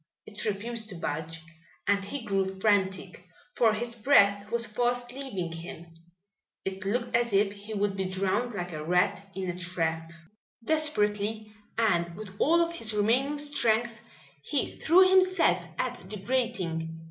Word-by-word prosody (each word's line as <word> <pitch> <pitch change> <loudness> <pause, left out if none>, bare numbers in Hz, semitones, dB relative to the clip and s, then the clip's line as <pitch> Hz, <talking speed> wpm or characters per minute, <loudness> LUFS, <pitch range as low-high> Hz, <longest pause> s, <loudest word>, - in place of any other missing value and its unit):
It 210 0 -5
refused 220 +2 -2
to 190 - -6
budge, 160 0 -4 0.4
and 200 0 +2
he 235 +4 -5
grew 195 -2 +1 0.2
frantic, 190 -3 +1 0.3
for 230 -2 +4
his 235 +2 -3
breath 205 -4 +4
was 235 0 +1
fast 245 +2 -1
leaving 245 -11 -4
him. 165 0 -8 0.7
It 190 0 -4
looked 235 +4 0
as 235 -2 +2
if 200 0 +3
he 205 +2 -8
would 200 -1 0
be 190 -1 -1
drowned 195 +5 -1
like 180 -2 -4
a 155 -1 -5
rat 180 +4 +1
in 190 -1 -3
a 175 - -2
trap. 165 -3 -2 0.6
Desperately 215 -8 0 0.2
and 170 -7 +1
with 200 -1 -8
all 335 +3 +4
of 335 - -3
his 225 -10 -2
remaining 250 +8 +2
strength 240 -6 +1 0.5
he 270 - -2
threw 370 +4 +6
himself 370 - +4
at 250 -4 -2
the 210 - -4
grating. 190 -8 -2
210 Hz, 150 wpm, -28 LUFS, 185-240 Hz, 0.7 s, threw